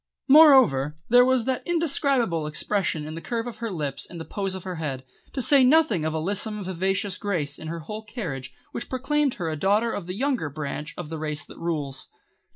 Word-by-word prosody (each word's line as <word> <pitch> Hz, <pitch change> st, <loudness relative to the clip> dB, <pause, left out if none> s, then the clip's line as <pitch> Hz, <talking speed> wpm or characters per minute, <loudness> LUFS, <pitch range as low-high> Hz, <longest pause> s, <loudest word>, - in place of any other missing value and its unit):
Moreover, 260 Hz, -, +6 dB
there 245 Hz, +1 st, +7 dB
was 255 Hz, -2 st, +2 dB
that 260 Hz, -1 st, -1 dB
indescribable 275 Hz, -, +1 dB
expression 160 Hz, 0 st, -1 dB
in 155 Hz, -, -6 dB
the 165 Hz, -, -6 dB
curve 230 Hz, +2 st, -3 dB
of 240 Hz, -2 st, -7 dB
her 230 Hz, -1 st, -3 dB
lips 150 Hz, -7 st, -4 dB
and 170 Hz, -, -8 dB
the 160 Hz, -, -6 dB
pose 195 Hz, -2 st, -3 dB
of 190 Hz, -, -7 dB
her 185 Hz, -2 st, -5 dB
head; 135 Hz, -5 st, -4 dB, 0.3 s
to 265 Hz, -, +1 dB
say 275 Hz, 0 st, +6 dB
nothing 255 Hz, -, +4 dB
of 155 Hz, -, -1 dB
a -, -, 0 dB
lissome, 205 Hz, +5 st, -2 dB
vivacious 190 Hz, +2 st, -1 dB
grace 165 Hz, -9 st, -2 dB
in 160 Hz, -, -7 dB
her 165 Hz, +1 st, -5 dB
whole 210 Hz, +8 st, -6 dB
carriage 170 Hz, -, -5 dB, 0.2 s
which 235 Hz, -, -6 dB
proclaimed 275 Hz, +1 st, 0 dB
her 175 Hz, -4 st, -4 dB
a -, -, -2 dB
daughter 205 Hz, +8 st, +2 dB
of 185 Hz, -5 st, -5 dB
the 180 Hz, -, -4 dB
younger 260 Hz, -, 0 dB
branch 150 Hz, +1 st, -5 dB
of 175 Hz, -4 st, -6 dB
the 160 Hz, -1 st, -5 dB
Race 150 Hz, -1 st, -2 dB
that -, -, -13 dB
Rules. 150 Hz, -5 st, -3 dB
190 Hz, 210 wpm, -25 LUFS, 155-245 Hz, 0.3 s, there